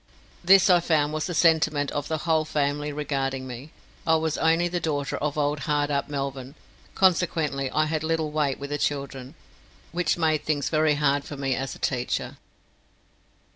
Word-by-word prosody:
This 190 +1 +6
I 180 -2 +6
found 155 -3 +1
was 155 0 -2
the 175 - -4
sentiment 155 -4 +3
of 145 0 -3
the 160 - -1
whole 160 -2 +2
family 145 -1 -1
regarding 135 -3 -2
me. 130 +3 -8 0.4
I 160 - +5
was 160 -1 0
only 165 +2 +2
the 175 0 -2
daughter 145 -4 -2
of 150 0 -2
old 145 0 0
hard 145 0 +1
up 140 0 -1
Melvyn, 135 -1 -4 0.4
consequently 160 -7 +1
I 155 +3 +1
had 155 0 -2
little 160 -1 -1
weight 150 -3 0
with 140 +1 -7
the 145 - -2
children, 140 -1 -3 0.6
which 175 +2 0
made 155 -3 +1
things 145 -2 -1
very 155 -1 +2
hard 145 -1 +1
for 145 - -8
me 135 -1 -1
as 135 +1 -3
a - - -12
teacher. 125 -2 -2
150 Hz, 175 wpm, -25 LUFS, 140-160 Hz, 0.6 s, This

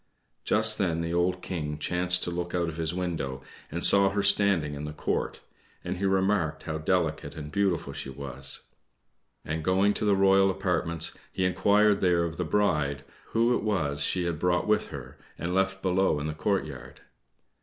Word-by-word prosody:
Just 110 0 +3
then 85 -4 0
the 85 0 -3
old 90 +1 0
King 75 -4 -4
chanced 90 +1 0
to 85 - -2
look 85 0 -4
out 85 -1 0
of 80 - -8
his 80 -1 -1
window 80 -7 -4 0.3
and 85 +2 +1
saw 100 0 +6
her 100 0 -1
standing 100 -7 +4
in 70 +1 -6
the 75 - -6
court, 75 - -2 0.4
and 90 +1 -4
he 100 - -2
remarked 95 -3 +1
how 80 0 -4
delicate 80 - -1
and 75 -2 -7
beautiful 95 -4 0
she - - -6
was; 70 0 -1 0.8
and, 80 +1 -3
going 95 +4 +3
to - - -3
the 100 -1 +4
royal 95 0 +4
apartments, 90 -4 -1 0.2
he 95 - -1
inquired 100 +3 +3
there 90 -2 +2
of 85 -1 -4
the 90 - -1
bride 75 -6 0 0.2
who 115 +2 +2
it - - -1
was 80 -9 0
she 90 - 0
had 85 -3 -2
brought 90 0 +1
with 105 0 +1
her 65 -3 -10 0.2
and 85 +1 -3
left 95 0 0
below 95 -4 +2
in 75 - -4
the 75 - -2
courtyard. 95 +6 -3
90 Hz, 185 wpm, -27 LUFS, 80-95 Hz, 0.8 s, saw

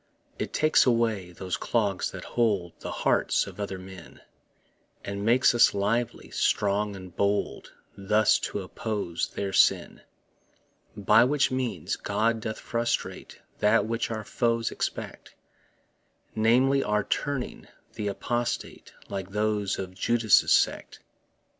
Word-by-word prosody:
It - - -3
takes 155 -3 +3
away 115 -7 +1
those 90 +1 -4
clogs 100 -5 0
that - - -8
hold 100 -8 0
The - - -6
hearts - - +1
of - - -11
other 100 -2 -4
men, 95 -2 -12 0.8
And 100 0 -4
makes 120 +4 +4
us 120 - +5
lively, 115 +4 -1
strong 100 0 0
and 95 -2 -11
bold 100 +1 -1 0.2
Thus 105 +2 +3
to - - -4
oppose 105 -7 -3
their 100 -1 -4
sin. - - +3 1.0
By 105 +3 +5
which 135 +2 +2
means 125 -11 -2
God 110 +3 0
doth 110 0 -4
frustrate 115 0 -3 0.2
That 105 +2 +3
which 115 +1 -2
our 110 -1 -4
foes 115 0 0
expect - - -5 1.0
Namely, 130 +5 +3
our 105 0 0
turning 140 +4 -3 0.3
th' 105 -2 -3
apostate, 120 +4 -3
Like 95 -1 -5
those 105 -1 -1
of 95 -1 -6
Judas' 115 +2 +3
sect. - - +1
105 Hz, 125 wpm, -27 LUFS, 100-115 Hz, 1.0 s, us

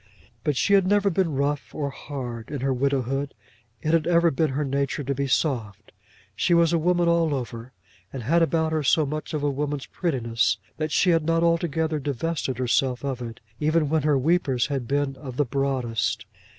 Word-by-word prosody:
But 150 -3 0
she 200 - +2
had 195 -2 +5
never 205 0 +3
been 165 -4 0
rough 140 +1 -1
or 140 -2 -2
hard 125 -6 -7
in 145 -3 -4
her 135 0 +1
widowhood. 135 +1 -1 0.5
It 155 - +1
had 165 -2 +2
ever 170 -1 +4
been 155 +3 +1
her 140 +3 -1
nature 140 +1 -1
to 140 +1 -1
be 140 +1 -2
soft. 115 -7 -1 0.4
She 170 - +2
was 170 0 +4
a 170 - +3
woman 175 +1 +2
all 165 -3 +2
over, 120 -1 -6 0.4
and 130 -3 -6
had 165 +8 +3
about 160 -1 +1
her 160 -1 +1
so 150 +2 +3
much 155 +2 -4
of 150 - -2
a 145 - +2
woman's 145 0 -3
prettiness, 115 - 0 0.2
that 155 0 -2
she 180 - +3
had 165 -2 +3
not 165 +1 +1
altogether 165 -2 +1
divested 140 -1 -2
herself 125 +1 +1
of 130 -3 -3
it, 115 -1 -7 0.2
even 155 0 +2
when 160 0 +2
her 145 -1 +2
weepers 135 -4 +2
had 135 -5 -3
been 140 0 0
of 130 -2 -8
the 145 - +2
broadest. 125 -4 -1
145 Hz, 195 wpm, -25 LUFS, 130-160 Hz, 0.5 s, had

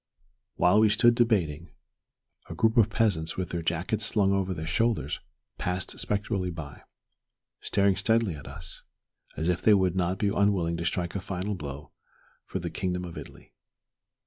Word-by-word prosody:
While 90 +4 +4
we 110 0 +5
stood 120 +3 +5
debating, 90 - +1 0.8
a - - -6
group 110 0 +2
of 110 -2 +5
peasants, 100 -8 0
with 95 -2 -2
their 85 - -2
jackets 90 +7 -1
slung 100 -2 +3
over 95 -1 0
their 80 -3 -4
shoulders, 115 +6 0 0.4
passed 90 +1 -2
spectrally 100 -2 -1
by, 80 -4 -8 0.8
staring 100 -1 +2
steadily 110 -4 +2
at 75 -2 -10
us, 85 0 -8 0.6
as 80 - -1
if 90 0 +1
they 105 - +6
would 95 -2 +2
not 90 0 0
be 100 +1 +1
unwilling 100 -5 +1
to 85 - -4
strike 85 +1 -1
a 100 - -2
final 95 +2 -3
blow 75 -5 -7 0.6
for - - -3
the - - -4
kingdom 90 -1 -2
of 85 - -8
Italy. - - -11
95 Hz, 165 wpm, -28 LUFS, 85-105 Hz, 0.8 s, they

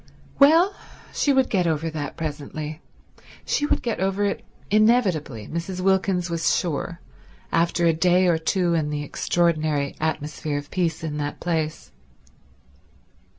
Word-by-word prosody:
Well, 325 +7 +6 0.4
she 285 - +2
would 265 -2 +3
get 180 -4 +1
over 160 0 -1
that 145 -3 -5
presently; 155 0 -5 0.6
she 295 - 0
would - - 0
get 235 -2 -2
over 195 +2 0
it 200 - -2 0.3
inevitably, 195 - +2
Mrs. 170 +3 -4
Wilkins 190 -1 +1
was 165 -1 +1
sure, 170 0 -3 0.5
after 170 +1 +2
a 165 - +4
day 180 +3 +3
or 170 -3 +3
two 175 +1 +1
in 155 -3 0
the 145 0 -3
extraordinary 155 -2 0
atmosphere 150 -1 -2
of 145 0 -7
peace 170 -4 -1
in 150 -2 -3
that 145 0 -4
place. 160 -3 -2
170 Hz, 140 wpm, -24 LUFS, 155-190 Hz, 0.6 s, Well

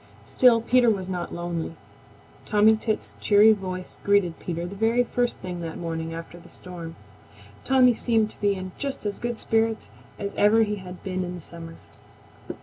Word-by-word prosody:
Still 240 -3 +4
Peter 245 +1 +4
was 195 -4 -1
not 180 -2 -4
lonely. 170 -1 -4 0.7
Tommy 215 +1 +5
Tit's 220 0 -3
cheery 210 +1 +6
voice 185 -3 -6
greeted 200 -4 +2
Peter 170 -1 -4
the 175 - -7
very 225 +4 +2
first 245 0 -1
thing 180 -2 -5
that 165 -1 -5
morning 165 -1 -4
after 165 +1 -8
the - - -16
storm. 170 -3 -9 0.7
Tommy 255 -2 +5
seemed 225 -2 +1
to - - -14
be 200 -1 +2
in 185 0 -6
just 275 -5 -4
as 205 -1 -3
good 240 -1 -3
spirits 225 0 0 0.3
as 200 -1 -4
ever 220 +2 +4
he 210 -1 -2
had 180 -1 -10
been 185 -1 -2
in 180 0 -5
summer. 165 0 -10
200 Hz, 170 wpm, -25 LUFS, 175-225 Hz, 0.7 s, cheery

